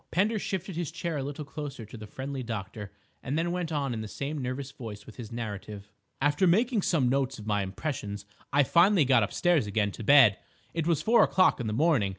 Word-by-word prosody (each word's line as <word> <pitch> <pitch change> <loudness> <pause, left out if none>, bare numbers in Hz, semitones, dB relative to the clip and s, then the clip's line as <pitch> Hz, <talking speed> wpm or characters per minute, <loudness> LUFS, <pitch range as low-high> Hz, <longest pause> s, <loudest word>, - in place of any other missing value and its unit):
Pender 210 +5 +1
shifted 190 -2 -4
his 170 -2 -2
chair 170 -1 -4
a 135 - -2
little 145 +2 -5
closer 145 -6 -7
to 110 - -12
the 110 -2 -9
friendly 135 +3 -5
doctor 105 -3 -6 0.3
and 140 +3 -2
then 170 +1 0
went 175 -2 -3
on 140 -4 -1
in 110 - -4
the 110 - -5
same 140 +7 -4
nervous 130 +1 -4
voice 105 -6 -9
with - - -13
his 120 -3 -8
narrative. 105 -3 -6 0.3
"After 145 +6 +2
making 220 +5 +3
some 155 -9 +2
notes 135 +1 0
of 105 - -10
my 105 -1 +1
impressions 105 0 -4 0.3
I 145 +1 +4
finally 175 +3 +4
got 130 -2 +4
upstairs 155 - +1
again 105 0 0
to 110 - -8
bed. 130 -5 +6 0.3
It 165 -1 -1
was 170 -3 +1
four 235 +1 +5
o'clock 185 -5 +4
in 120 - -3
the 105 - -2
morning. 140 -6 +2
135 Hz, 215 wpm, -28 LUFS, 110-165 Hz, 0.3 s, bed